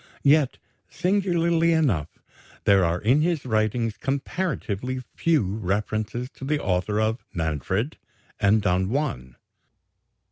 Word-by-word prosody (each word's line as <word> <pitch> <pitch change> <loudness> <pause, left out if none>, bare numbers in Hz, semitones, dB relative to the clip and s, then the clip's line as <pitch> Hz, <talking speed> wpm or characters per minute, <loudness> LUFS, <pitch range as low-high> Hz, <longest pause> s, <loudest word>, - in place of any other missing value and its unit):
Yet, 145 -1 +4 0.3
singularly 170 -3 +2
enough, 110 - 0 0.5
there 100 -2 +5
are 85 +1 +1
in 125 +10 +3
his 165 -3 0
writings 110 -1 0
comparatively 135 - -2
few 165 -6 +2
references 105 +4 -2
to - - -10
the 145 +2 0
author 95 0 0
of 110 +2 0
"Manfred" 85 - -1 0.4
and 100 +1 +3
"Don 95 0 +1
Juan." 110 - -2
115 Hz, 110 wpm, -25 LUFS, 100-150 Hz, 0.5 s, there